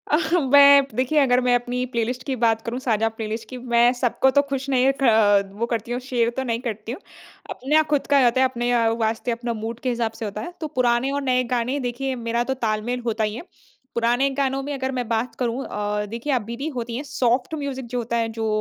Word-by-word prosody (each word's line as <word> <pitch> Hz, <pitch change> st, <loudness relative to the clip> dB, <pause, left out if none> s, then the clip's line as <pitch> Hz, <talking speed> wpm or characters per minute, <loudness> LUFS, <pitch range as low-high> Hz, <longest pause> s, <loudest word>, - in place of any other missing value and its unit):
अह 315 Hz, 0 st, 0 dB, 0.2 s
बै 285 Hz, 0 st, +9 dB, 0.3 s
देखिए 260 Hz, +5 st, +2 dB
अगर 250 Hz, -3 st, +4 dB
मैं 250 Hz, 0 st, +2 dB
अपनी 245 Hz, +1 st, -1 dB
प्लेलिस्ट 245 Hz, +2 st, -1 dB
की 270 Hz, -1 st, -2 dB
बात 225 Hz, -1 st, +3 dB
करूँ 240 Hz, +2 st, -3 dB
साझा 225 Hz, -3 st, +1 dB
प्लेलिस्ट 220 Hz, +1 st, -4 dB
की 255 Hz, -, -7 dB, 0.2 s
मैं 235 Hz, +1 st, +6 dB
सबको 260 Hz, +2 st, +2 dB
तो -, -, +8 dB
खुश 270 Hz, 0 st, -2 dB
नहीं 260 Hz, 0 st, +3 dB
खा 245 Hz, -, +5 dB, 0.5 s
वो -, -, +3 dB
करती 230 Hz, +1 st, -3 dB
हूँ 245 Hz, -, -1 dB
शेयर 235 Hz, -2 st, +2 dB
तो 265 Hz, -, 0 dB
नहीं 230 Hz, -, -1 dB
करती 220 Hz, 0 st, -5 dB
हूँ। 255 Hz, -, -6 dB, 0.5 s
आपना 300 Hz, +5 st, +2 dB
खुद 285 Hz, -, +1 dB
का 280 Hz, -, +6 dB
जाता 245 Hz, 0 st, +3 dB
है -, -, +5 dB
अपने 240 Hz, -1 st, -2 dB
अ, 230 Hz, -2 st, +3 dB
वास्ते 225 Hz, +2 st, -1 dB
अपना 235 Hz, 0 st, -3 dB
मूड 230 Hz, +1 st, -4 dB
के 255 Hz, -, -2 dB
हिसाब 235 Hz, -2 st, -1 dB
से -, -, -2 dB
होता 210 Hz, 0 st, -5 dB
है। 345 Hz, -, -7 dB
तो 310 Hz, -, -2 dB
पुराने 240 Hz, +2 st, +2 dB
और 285 Hz, 0 st, -1 dB
नए 255 Hz, 0 st, +3 dB
गाने 245 Hz, +4 st, -1 dB
देखिए 265 Hz, +2 st, -3 dB
मेरा 235 Hz, +1 st, +1 dB
तो 265 Hz, -, -1 dB
ताल-मेल 220 Hz, +3 st, -1 dB
होता 225 Hz, -1 st, 0 dB
ही 210 Hz, 0 st, -1 dB
है 240 Hz, -, -7 dB, 0.5 s
पुराने 240 Hz, +4 st, +2 dB
गानों 270 Hz, -1 st, 0 dB
में 290 Hz, +1 st, -4 dB
अगर 265 Hz, -1 st, -2 dB
मैं 250 Hz, -3 st, -3 dB
बात 230 Hz, +2 st, -1 dB
करूँ 245 Hz, +1 st, -1 dB
अ, 210 Hz, 0 st, -2 dB
देखिए 235 Hz, +6 st, -3 dB
आप 250 Hz, -, +1 dB
बीदी 270 Hz, +6 st, -4 dB
होती 235 Hz, -1 st, -4 dB
हैं 270 Hz, -, -4 dB
सॉफ्ट 250 Hz, 0 st, 0 dB
म्यूज़िक 275 Hz, -3 st, -4 dB
जो -, -, 0 dB
होता 235 Hz, 0 st, -2 dB
है 230 Hz, -1 st, 0 dB
जो 220 Hz, -, 0 dB
245 Hz, 235 wpm, -23 LUFS, 230-265 Hz, 0.5 s, बै